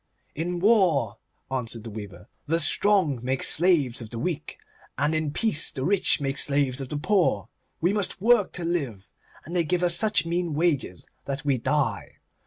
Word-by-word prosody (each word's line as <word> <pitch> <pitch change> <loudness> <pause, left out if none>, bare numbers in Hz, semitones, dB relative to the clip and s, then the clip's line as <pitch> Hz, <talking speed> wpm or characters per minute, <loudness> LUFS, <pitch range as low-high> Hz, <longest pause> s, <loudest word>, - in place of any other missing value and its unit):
'In 175 +3 -3
war,' 190 -7 +2 0.3
answered 115 -4 -3
the 115 - -8
weaver, 100 -4 -9 0.2
'the 165 +2 +1
strong 170 - +2
make 130 +1 -1
slaves 150 -9 +2
of 110 - -8
the 115 - -5
weak, 155 +4 -4 0.4
and 145 +3 +1
in 155 -1 -1
peace 160 0 +1
the 130 -1 -4
rich 195 -3 +2
make 135 -1 -2
slaves 140 -2 +1
of 130 - -6
the 150 - -3
poor. 155 - +1 0.3
We 175 +4 +2
must 205 -3 -1
work 225 -1 +3
to 175 - -3
live, 135 - -3 0.3
and 170 +5 -7
they 175 - +3
give 180 +2 -1
us 175 -1 +4
such 215 -3 +2
mean 170 -2 -2
wages 150 - -1 0.2
that 140 +1 -4
we 135 -3 +1
die. 150 +3 -1
155 Hz, 180 wpm, -25 LUFS, 130-180 Hz, 0.4 s, us